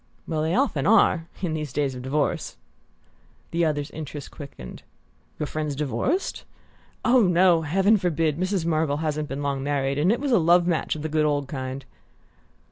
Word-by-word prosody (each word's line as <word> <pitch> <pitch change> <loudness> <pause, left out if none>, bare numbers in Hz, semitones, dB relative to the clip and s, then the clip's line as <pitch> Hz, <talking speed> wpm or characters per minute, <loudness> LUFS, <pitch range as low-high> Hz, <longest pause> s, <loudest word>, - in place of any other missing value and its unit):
"Well, 155 -2 -1
they 160 +3 0
often 210 - +1
are 190 -6 +4 0.2
in 170 -3 0
these 150 -3 -4
days 140 0 -1
of 125 - -7
divorce!" 140 +3 -1 0.9
The 170 +1 +1
other's 145 -2 -1
interest 150 -2 -7
quickened. 135 - -10 0.6
"Your 150 - -2
friend's 150 -1 -3
divorced?" 150 - -1 0.6
"Oh, 250 0 +5
no; 175 -1 +4
heaven 190 +7 +3
forbid! 165 -4 0
Mrs. 185 -2 -1
Marvell 155 -3 +1
hasn't 150 -1 -2
been 140 +2 -4
long 140 -1 -1
married; 140 0 -1
and 170 +6 +3
it 235 - +1
was 280 0 -2
a 230 - +5
love 175 +1 +4
match 170 -3 0
of 155 - -6
the - - -1
good 155 0 +1
old 145 -2 0
kind." 130 -1 -5
155 Hz, 175 wpm, -25 LUFS, 145-175 Hz, 0.9 s, Oh